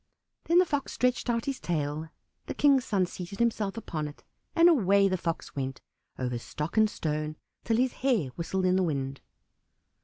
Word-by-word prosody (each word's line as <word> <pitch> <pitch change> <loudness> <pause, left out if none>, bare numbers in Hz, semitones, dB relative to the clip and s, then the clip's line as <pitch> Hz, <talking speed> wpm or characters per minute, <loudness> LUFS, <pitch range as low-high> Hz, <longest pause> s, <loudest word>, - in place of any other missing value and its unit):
Then 340 - +3
the 365 - +7
Fox 285 -5 -2
stretched 250 0 +1
out 230 -1 0
his 275 -2 -2
tail, 155 -1 -2 0.4
the - - -4
King's 275 -3 +4
son 195 -4 +2
seated 180 +2 -7
himself 225 -3 0
upon 155 -9 -3
it, 145 - -12 0.3
and 335 0 +7
away 200 - +5
the 185 - +1
Fox 170 -2 -4
went, 135 -2 -3 0.4
over 125 -2 -2
stock 150 +6 -5
and 220 -1 +5
stone, 155 -3 -3 0.3
till 225 - +2
his 255 +1 +2
hair 240 - +2
whistled 180 +6 -2
in 185 0 +3
the - - +3
wind. 140 -5 -2
185 Hz, 180 wpm, -29 LUFS, 155-235 Hz, 0.4 s, the